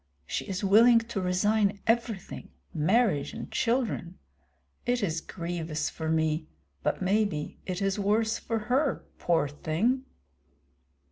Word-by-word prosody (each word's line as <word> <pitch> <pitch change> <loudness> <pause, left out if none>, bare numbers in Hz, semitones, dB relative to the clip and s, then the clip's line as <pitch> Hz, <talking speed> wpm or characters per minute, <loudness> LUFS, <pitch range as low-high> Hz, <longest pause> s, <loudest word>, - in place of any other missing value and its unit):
She - - -3
is 195 0 -4
willing 225 +5 +7
to 225 -3 -1
resign 200 +3 +2
everything, 225 -4 -1 0.2
marriage 180 0 +2
and - - -7
children. 230 -7 0 0.7
It 245 -2 0
is 165 -4 -1
grievous 165 -4 -3
for 160 0 -4
me, 160 0 +1 0.3
but 185 - -1
maybe 190 -6 0
it 185 +1 -2
is 195 +1 0
worse 220 +3 +1
for 230 - -2
her, 265 +4 +1
poor 165 -4 +2
thing!" 180 - 0
195 Hz, 125 wpm, -28 LUFS, 165-225 Hz, 0.7 s, willing